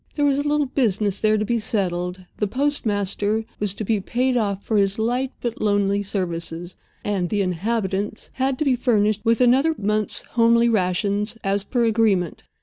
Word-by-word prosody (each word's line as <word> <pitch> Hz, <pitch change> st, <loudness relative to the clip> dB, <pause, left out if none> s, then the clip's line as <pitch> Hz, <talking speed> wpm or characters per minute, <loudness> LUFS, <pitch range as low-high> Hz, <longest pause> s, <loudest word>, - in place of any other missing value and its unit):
There 290 Hz, -, +1 dB
was 280 Hz, -1 st, +2 dB
a 290 Hz, -, -1 dB
little 295 Hz, 0 st, +2 dB
business 210 Hz, -7 st, 0 dB
there 215 Hz, 0 st, +3 dB
to 210 Hz, -, -1 dB
be 235 Hz, +1 st, 0 dB
settled—the 185 Hz, -2 st, -2 dB
postmaster 215 Hz, -5 st, -1 dB
was 205 Hz, -2 st, -1 dB
to 215 Hz, -, -4 dB
be 215 Hz, 0 st, +1 dB
paid 250 Hz, +6 st, 0 dB
off 200 Hz, -4 st, -1 dB
for 220 Hz, -, 0 dB
his 195 Hz, 0 st, +1 dB
light 245 Hz, +4 st, 0 dB
but 235 Hz, -2 st, -3 dB
lonely 205 Hz, -1 st, +2 dB
services, 175 Hz, -3 st, -4 dB, 0.3 s
and 195 Hz, -4 st, -1 dB
the 205 Hz, -2 st, +1 dB
"inhabitants" 200 Hz, +2 st, -2 dB
had 265 Hz, 0 st, 0 dB
to 305 Hz, -, -1 dB
be 265 Hz, -2 st, +3 dB
furnished 215 Hz, -4 st, +1 dB
with 230 Hz, +1 st, +2 dB
another 270 Hz, +6 st, +4 dB
month's 210 Hz, +1 st, 0 dB
homely 235 Hz, 0 st, +4 dB
rations, 205 Hz, +2 st, 0 dB
as 195 Hz, 0 st, 0 dB
per 240 Hz, +2 st, 0 dB
agreement. 210 Hz, -6 st, +1 dB
215 Hz, 170 wpm, -22 LUFS, 195-235 Hz, 0.3 s, another